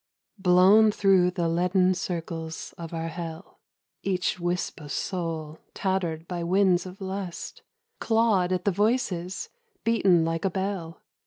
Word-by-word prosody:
BLOWN 190 Hz, +4 st, +6 dB
through 195 Hz, -3 st, +4 dB
the 175 Hz, -2 st, -1 dB
leaden 180 Hz, +2 st, +2 dB
circles 165 Hz, -3 st, -5 dB
of 165 Hz, -1 st, -8 dB
our 165 Hz, -1 st, -3 dB
hell, 165 Hz, +1 st, -8 dB, 0.4 s
Each 185 Hz, -2 st, -1 dB
wisp 175 Hz, -1 st, -2 dB
of 145 Hz, -1 st, -9 dB
soul, 165 Hz, -4 st, -3 dB, 0.2 s
tattered 175 Hz, -4 st, -1 dB
by 175 Hz, -2 st, -3 dB
winds 185 Hz, 0 st, +2 dB
of 185 Hz, +2 st, -11 dB
lust, 190 Hz, -2 st, -5 dB, 0.4 s
Clawed 220 Hz, -5 st, +2 dB
at 185 Hz, -1 st, -1 dB
the 200 Hz, -, +3 dB
voices, 195 Hz, -3 st, -1 dB, 0.3 s
beaten 190 Hz, -7 st, +3 dB
like 165 Hz, 0 st, -2 dB
a 195 Hz, -, +2 dB
bell. 190 Hz, -3 st, -4 dB
180 Hz, 135 wpm, -26 LUFS, 170-195 Hz, 0.4 s, BLOWN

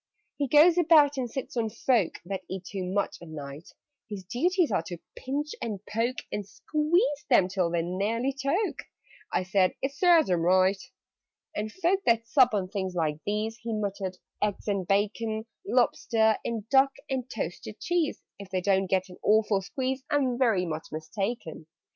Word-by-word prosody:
"He 285 Hz, -, 0 dB
goes 320 Hz, +6 st, +6 dB
about 305 Hz, -4 st, +6 dB
and 250 Hz, -2 st, -2 dB
sits 265 Hz, +2 st, -6 dB
on 225 Hz, -2 st, 0 dB
folk 225 Hz, -3 st, +1 dB
That 190 Hz, +1 st, -4 dB
eat 185 Hz, -1 st, -5 dB
too 195 Hz, -1 st, -4 dB
much 195 Hz, +3 st, -1 dB
at 170 Hz, -, -10 dB
night: 145 Hz, 0 st, -8 dB, 0.4 s
His 200 Hz, -3 st, -6 dB
duties 330 Hz, -, +1 dB
are -, -, +2 dB
to 175 Hz, -, -5 dB, 0.2 s
pinch, 290 Hz, +3 st, -3 dB
and 215 Hz, -4 st, -3 dB
poke, 230 Hz, +4 st, -1 dB
And 210 Hz, -, -2 dB
squeeze 300 Hz, -, 0 dB
them 215 Hz, -8 st, +5 dB
till 185 Hz, -2 st, 0 dB
they 170 Hz, -1 st, 0 dB
nearly 215 Hz, +9 st, -1 dB
choke." 280 Hz, +10 st, -1 dB, 0.5 s
(I -, -, +1 dB
said 185 Hz, 0 st, +2 dB
"It 270 Hz, +1 st, -2 dB
serves 335 Hz, +1 st, +5 dB
them 175 Hz, -2 st, +2 dB
right!") 185 Hz, +3 st, +3 dB, 0.7 s
"And 215 Hz, +1 st, -3 dB
folk 375 Hz, -, +1 dB
that 230 Hz, -1 st, +3 dB
sup 250 Hz, -1 st, +4 dB
on 190 Hz, -2 st, -1 dB
things 190 Hz, -2 st, -3 dB
like 155 Hz, -3 st, 0 dB
these 215 Hz, +2 st, -1 dB
" -, -, -29 dB
He 230 Hz, 0 st, -3 dB
muttered, 195 Hz, -3 st, -3 dB, 0.2 s
"eggs 210 Hz, 0 st, -1 dB
and 195 Hz, -3 st, -1 dB
bacon 215 Hz, +2 st, 0 dB, 0.2 s
Lobster 225 Hz, -3 st, +2 dB
and 225 Hz, -2 st, -4 dB
duck 270 Hz, 0 st, +5 dB
and 260 Hz, -2 st, -3 dB
toasted -, -, -5 dB
cheese 345 Hz, -4 st, -1 dB, 0.2 s
If 200 Hz, -2 st, -9 dB
they 185 Hz, -1 st, -1 dB
don't 195 Hz, 0 st, +2 dB
get 185 Hz, 0 st, +1 dB
an 180 Hz, -, -12 dB
awful 210 Hz, -2 st, +3 dB
squeeze, 260 Hz, +6 st, -3 dB
I'm 270 Hz, -4 st, +1 dB
very 225 Hz, -8 st, +2 dB
much 160 Hz, -2 st, -5 dB
mistaken! 160 Hz, +1 st, -4 dB
215 Hz, 175 wpm, -28 LUFS, 190-265 Hz, 0.7 s, goes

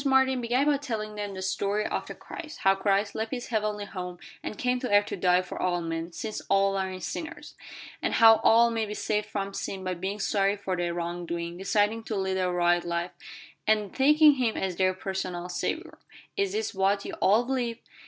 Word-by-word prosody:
Martin 265 Hz, -2 st, +3 dB
began 245 Hz, +4 st, +1 dB
by 295 Hz, -1 st, +3 dB
telling 220 Hz, -6 st, -4 dB
them 205 Hz, -2 st, -5 dB
the 190 Hz, -, -5 dB
story 200 Hz, +2 st, 0 dB
of -, -, -2 dB
the -, -, -7 dB
Christ 310 Hz, -2 st, -9 dB
how 195 Hz, -, +5 dB
Christ 200 Hz, +1 st, +1 dB
left 220 Hz, 0 st, -3 dB
His 245 Hz, 0 st, -5 dB
heavenly 210 Hz, -2 st, -1 dB
home, 180 Hz, -3 st, -6 dB, 0.2 s
and 210 Hz, -, -6 dB
came 250 Hz, 0 st, 0 dB
to 250 Hz, -, -3 dB
earth 205 Hz, 0 st, +5 dB
to -, -, -4 dB
die 180 Hz, 0 st, +3 dB
for 185 Hz, -, -7 dB
all 180 Hz, -1 st, +1 dB
men, 165 Hz, 0 st, -4 dB
since 215 Hz, +6 st, -5 dB
all 195 Hz, 0 st, +3 dB
are 190 Hz, -1 st, -2 dB
sinners; 315 Hz, -, -6 dB, 0.5 s
and -, -, 0 dB
how 225 Hz, -1 st, +8 dB
all 230 Hz, +1 st, +5 dB
may 225 Hz, -1 st, -1 dB
be 210 Hz, -, -5 dB
saved 210 Hz, 0 st, -1 dB
from 200 Hz, -2 st, -3 dB
sin 190 Hz, -1 st, -4 dB
by 185 Hz, 0 st, -1 dB
being 190 Hz, +4 st, -4 dB
sorry 200 Hz, 0 st, +1 dB
for 195 Hz, -2 st, -2 dB
their 175 Hz, -1 st, -2 dB
wrong 175 Hz, 0 st, -4 dB
doing, 170 Hz, 0 st, -3 dB
deciding 205 Hz, +4 st, +1 dB
to 220 Hz, -, -3 dB
lead 190 Hz, -1 st, -1 dB
a 185 Hz, -1 st, +1 dB
right 175 Hz, 0 st, +2 dB
life, 170 Hz, +1 st, -2 dB, 0.6 s
and 210 Hz, -2 st, +2 dB
taking 300 Hz, +1 st, +6 dB
Him 240 Hz, -4 st, 0 dB
as 190 Hz, -2 st, -2 dB
their 185 Hz, -1 st, +2 dB
personal 185 Hz, -2 st, -4 dB
Saviour. 180 Hz, -, -3 dB, 0.4 s
"Is 395 Hz, -1 st, 0 dB
this 430 Hz, -, -2 dB
what 195 Hz, +1 st, +1 dB
you -, -, -5 dB
all 210 Hz, +5 st, +5 dB
believe?" 245 Hz, -3 st, -1 dB
200 Hz, 210 wpm, -27 LUFS, 185-225 Hz, 0.6 s, how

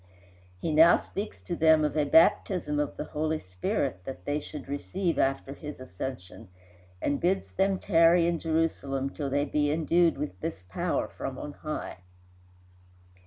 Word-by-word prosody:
He 160 Hz, -, -2 dB
now 160 Hz, +3 st, +7 dB
speaks 205 Hz, +2 st, -6 dB
to 175 Hz, -, -3 dB
them 160 Hz, -1 st, +5 dB
of 150 Hz, -, -2 dB
a 150 Hz, -1 st, +2 dB
baptism 160 Hz, 0 st, +3 dB
of 150 Hz, -, -2 dB
the -, -, -3 dB
Holy 155 Hz, +1 st, -2 dB
Spirit 90 Hz, 0 st, -2 dB
that 135 Hz, -, -8 dB
they 145 Hz, +1 st, 0 dB
should 150 Hz, 0 st, -9 dB
receive 170 Hz, +6 st, -2 dB
after 135 Hz, 0 st, 0 dB
his 150 Hz, 0 st, -8 dB
ascension, 115 Hz, -2 st, -7 dB, 0.5 s
and 145 Hz, -, -1 dB
bids 190 Hz, +2 st, 0 dB
them 195 Hz, 0 st, +1 dB
tarry 170 Hz, -2 st, +4 dB
in 170 Hz, -1 st, 0 dB
Jerusalem 140 Hz, -4 st, -1 dB
till 145 Hz, -3 st, -4 dB
they 145 Hz, +2 st, +1 dB
be 145 Hz, 0 st, +1 dB
endued 165 Hz, +1 st, +2 dB
with 140 Hz, -10 st, -5 dB
this 160 Hz, -, -5 dB
power 95 Hz, -, -1 dB
from -, -, -6 dB
on -, -, -6 dB
high. -, -, -5 dB
150 Hz, 160 wpm, -28 LUFS, 140-165 Hz, 0.5 s, now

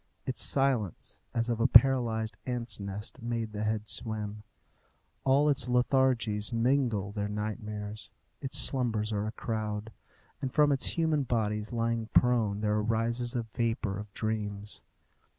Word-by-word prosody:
Its 130 Hz, -, -1 dB
silence, 130 Hz, -, +1 dB
as 115 Hz, 0 st, -1 dB
of 120 Hz, -2 st, -1 dB
a 120 Hz, -, +4 dB
paralyzed 115 Hz, -3 st, +5 dB
ants' 120 Hz, -3 st, -2 dB
nest, 100 Hz, +5 st, -6 dB
makes 115 Hz, -1 st, -3 dB
the 105 Hz, 0 st, -4 dB
head 110 Hz, 0 st, -1 dB
swim. 105 Hz, 0 st, -3 dB, 0.8 s
All 135 Hz, +3 st, +4 dB
its 140 Hz, -3 st, +3 dB
lethargies 125 Hz, -4 st, +2 dB
mingle 115 Hz, -4 st, +1 dB
their 100 Hz, -1 st, -2 dB
nightmares, 105 Hz, -1 st, -5 dB, 0.3 s
its 135 Hz, -2 st, 0 dB
slumbers 115 Hz, -5 st, +2 dB
are 105 Hz, +1 st, -1 dB
a -, -, -3 dB
crowd, 110 Hz, -1 st, -4 dB, 0.5 s
and 130 Hz, -, -2 dB
from 150 Hz, +1 st, +4 dB
its 135 Hz, -2 st, 0 dB
human 160 Hz, -3 st, +2 dB
bodies 110 Hz, -4 st, -1 dB
lying 115 Hz, -1 st, -1 dB
prone 115 Hz, -5 st, +3 dB
there 105 Hz, 0 st, +1 dB
arises 115 Hz, +3 st, -1 dB
a 120 Hz, -, 0 dB
vapour 115 Hz, -4 st, -1 dB
of 105 Hz, 0 st, -8 dB
dreams. 105 Hz, -2 st, -3 dB
115 Hz, 140 wpm, -30 LUFS, 105-125 Hz, 0.8 s, paralyzed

